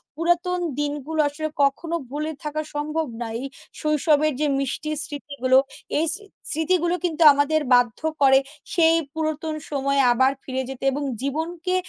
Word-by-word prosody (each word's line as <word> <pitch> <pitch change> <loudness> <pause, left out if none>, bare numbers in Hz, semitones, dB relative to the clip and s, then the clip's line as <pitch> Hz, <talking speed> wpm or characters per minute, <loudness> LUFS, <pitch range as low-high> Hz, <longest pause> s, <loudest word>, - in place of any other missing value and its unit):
পুরাতন 345 +3 +1 0.2
দিনগুলো 295 +1 -3
আসলে 310 +2 -4 0.2
কখনো 320 +5 0
ভুলে 300 +3 -3
থাকা 300 0 -2
সম্ভব 305 +2 -2 0.2
নয় 230 0 -3 0.4
শৈশবের 305 0 +2
যে - - +3
মিষ্টির 300 +3 -2
স্মৃতিগুলো। 280 -3 0 0.4
এই 315 - +2
স্রি 415 +4 -7 0.3
স্মৃতিগুলো 340 +2 +1
কিন্তু 330 -1 +1
আমাদের 290 +2 +2
বাধ্য 245 -2 +3 0.2
করে 270 -1 +7 0.3
সেই 330 -1 +5 0.2
পুরাতন 315 0 -2 0.2
সময়ে 275 -1 +1
আবার 260 +2 +4
ফিরে 260 0 -3
যেতে 270 0 -8
এবং 285 +2 -3 0.2
জীবনকে 325 +6 -2
305 Hz, 135 wpm, -23 LUFS, 275-320 Hz, 0.4 s, করে